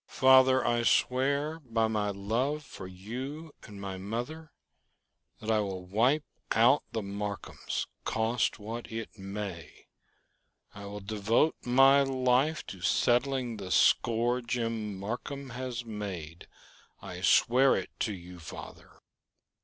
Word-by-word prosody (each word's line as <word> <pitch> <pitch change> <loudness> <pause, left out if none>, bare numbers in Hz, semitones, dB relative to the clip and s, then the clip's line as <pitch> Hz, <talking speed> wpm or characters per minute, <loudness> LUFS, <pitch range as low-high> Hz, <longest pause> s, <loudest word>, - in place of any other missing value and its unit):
"Father! 130 -1 +5
I 120 0 +2
swear 140 +6 +1
by 115 -6 0
my 105 -2 0
love 115 +10 -1
for 95 - -9
you 130 - -7
and 105 -3 -11
my 95 -1 -5
mother 120 +11 -5 0.9
that 110 +1 -2
I 110 - +3
will 95 -3 -3
wipe 120 +11 +2 0.3
out 125 +6 +5
the 110 -2 -3
Marcums, 100 0 -4 0.2
cost 110 +1 0
what 115 +3 -7
it 115 -1 -6
may. 95 -3 -7 0.9
I 100 0 -9
will 100 +1 -7
devote 110 +8 +1
my 135 +3 +6
life 135 +3 +1
to 95 - -9
settling 125 +2 +1
the 95 -2 -7
score 120 +5 +3
Jim 115 -4 -2
Marcum 130 +6 -5
has 120 -1 -5
made. 95 -7 -6 0.6
I - - -7
swear 130 +3 +5
it - - -4
to 110 - -1
you, 90 0 -11
father!" 80 - -11
115 Hz, 125 wpm, -30 LUFS, 100-130 Hz, 0.9 s, my